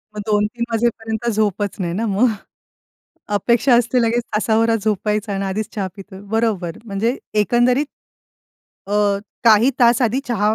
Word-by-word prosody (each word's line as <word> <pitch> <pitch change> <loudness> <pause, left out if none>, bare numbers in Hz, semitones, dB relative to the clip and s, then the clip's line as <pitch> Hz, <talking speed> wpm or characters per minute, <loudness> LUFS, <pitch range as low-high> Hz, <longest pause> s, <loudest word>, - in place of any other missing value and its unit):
मग 210 - -4
2-3 210 +2 0
वाजेपर्यंत 225 0 -1
झोपच 205 -2 -1
नाही 175 -3 -2
ना 220 +6 -1
मग? 205 +5 +3 1.1
अपेक्षा 235 +5 +3
असते 245 +1 +2
लगेच 235 +1 +1
तासाभर 225 +1 +2
झोपायचं 210 -1 -1
आणि 195 0 -2
आधीच 200 +2 -3
चहा 200 -3 -2
पितोय, 195 -1 -11
बरोबर. 215 -7 -1
म्हणजे 225 +4 -1 0.3
एकंदरीत, 245 +6 +2 1.0
अ, 200 - -5 0.5
काही 225 +3 +6
तास 240 +1 +5
आधी 245 +3 +1
चहा 215 -2 +1
220 Hz, 135 wpm, -19 LUFS, 205-235 Hz, 1.1 s, काही